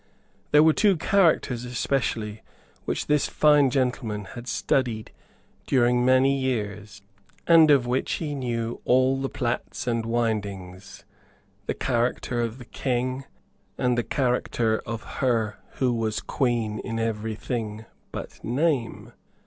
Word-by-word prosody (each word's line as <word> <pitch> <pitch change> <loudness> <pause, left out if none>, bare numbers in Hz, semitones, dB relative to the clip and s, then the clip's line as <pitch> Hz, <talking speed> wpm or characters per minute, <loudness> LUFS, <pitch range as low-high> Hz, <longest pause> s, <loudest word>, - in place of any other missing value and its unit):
There 150 +1 +6
were 160 0 +5
two 200 -1 +3
characters 160 -10 +2
especially 120 -4 -2 0.4
which - - -2
this 150 -1 +2
fine 150 -2 +4
gentleman 125 -6 -1
had 120 +1 -9
studied 120 -4 -1 0.6
during 125 -1 +3
many 130 +2 +4
years, 105 -6 -3 0.4
and 165 -2 +7
of 140 -4 +5
which 125 +2 -1
he 150 -3 -3
knew 120 -4 -3
all 130 +1 +3
the 135 - -2
plaits 120 -2 -3
and 115 -2 0
windings, 100 -5 -3 0.6
the - - -1
character 120 0 -1
of 115 0 -3
the 125 - -11
King, 130 +1 -2 0.5
and 125 -1 +1
the 120 - +1
character 120 -4 0
of 115 +1 -4 0.2
her 115 -5 +1
who 125 -2 +1
was 110 -2 -1
Queen 120 -5 -1
in 115 -2 -4
every 110 -1 -2
thing 110 -1 -4 0.3
but - - -8
name. 130 -1 -1
120 Hz, 130 wpm, -25 LUFS, 115-135 Hz, 0.6 s, and